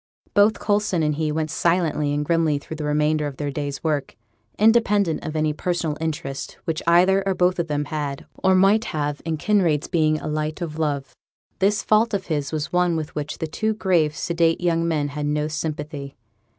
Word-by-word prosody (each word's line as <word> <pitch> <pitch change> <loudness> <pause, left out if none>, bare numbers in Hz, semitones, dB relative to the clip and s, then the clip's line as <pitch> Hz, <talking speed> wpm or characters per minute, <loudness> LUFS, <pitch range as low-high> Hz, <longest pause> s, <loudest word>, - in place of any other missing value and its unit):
Both 205 +2 +4
Coulson 205 -5 +1
and 150 0 +1
he 155 +1 -1
went 155 0 -2
silently 165 -4 +1
and 145 0 -1
grimly 165 -2 +2
through 155 +2 -8
the 155 - -4
remainder 150 0 +1
of 140 -2 -7
their 145 -1 -3
day's 145 +1 -4
work. 150 -4 -1 0.4
Independent 210 -5 +3
of 155 -1 -5
any 155 -1 +1
personal 170 -1 -2
interest 145 -4 -4
which 160 -1 -2
either 185 +3 +5
or 190 - +1
both 180 0 +2
of 170 - 0
them 145 -1 -1
had 145 -2 -4 0.2
or 190 0 +5
might 195 +4 +4
have 145 -1 -3
in 160 -1 -1
Kinraid's 170 -5 +1
being 155 -2 +2
a - - -6
light 155 +1 -2
o' 170 -3 -3
love, 145 -4 -2 0.5
this 200 +2 +2
fault 220 +1 +3
of 190 - -3
his 145 -4 -2
was 155 0 -3
one 180 -1 +2
with 155 -2 -4
which 150 0 -4
the - - -3
two 215 +7 -1
grave, 170 -7 +1
sedate 165 -1 +1
young 170 -1 +1
men 150 -3 0
had 145 +1 -3
no 150 0 0
sympathy. 150 -2 -5
155 Hz, 195 wpm, -23 LUFS, 150-180 Hz, 0.5 s, either